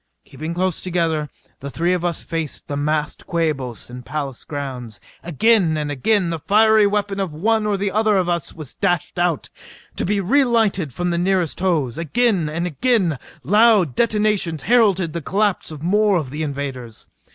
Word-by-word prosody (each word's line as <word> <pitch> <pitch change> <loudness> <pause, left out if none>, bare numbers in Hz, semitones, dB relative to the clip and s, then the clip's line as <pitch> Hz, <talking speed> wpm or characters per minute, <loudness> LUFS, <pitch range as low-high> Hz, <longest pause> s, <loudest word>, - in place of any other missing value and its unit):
Keeping 155 +4 -6
close 185 -1 -1
together, 165 -4 -1 0.3
the 140 - -6
three 170 +5 0
of 180 -1 -1
us 175 -1 -2
faced 165 -4 -4
the 145 - -3
massed 150 +1 -2
Quabos 150 -8 -2
in 125 - -9
the - - -8
palace 140 -1 -5
grounds. 130 -7 -6 0.2
Again 175 - +2
and 150 -1 -2
again 175 - +1
the 165 - -3
fiery 215 +4 +4
weapon 200 -1 -1
of 185 -6 -3
one 215 +5 +1
or 205 -1 +1
the 195 0 -1
other 215 0 +2
of 185 -2 +1
us 170 -2 -1
was 155 -5 -9
dashed 180 -2 -1
out 175 -4 0 0.5
to - - -1
be 205 +2 0
re 260 +10 +3
lighted 215 - +1
from 175 +7 -2
the 170 - 0
nearest 180 -3 0
hose. 160 -8 0
Again 185 - +1
and 170 +3 -2
again 180 - +1 0.2
loud 205 - +4
detonations 210 - 0
heralded 200 -9 +3
the 170 - -3
collapse 200 +4 0
of 155 -1 -8
more 205 +2 +3
of 145 -6 -4
the 150 +2 -4
invaders. 135 -6 -5
175 Hz, 180 wpm, -20 LUFS, 150-205 Hz, 0.5 s, fiery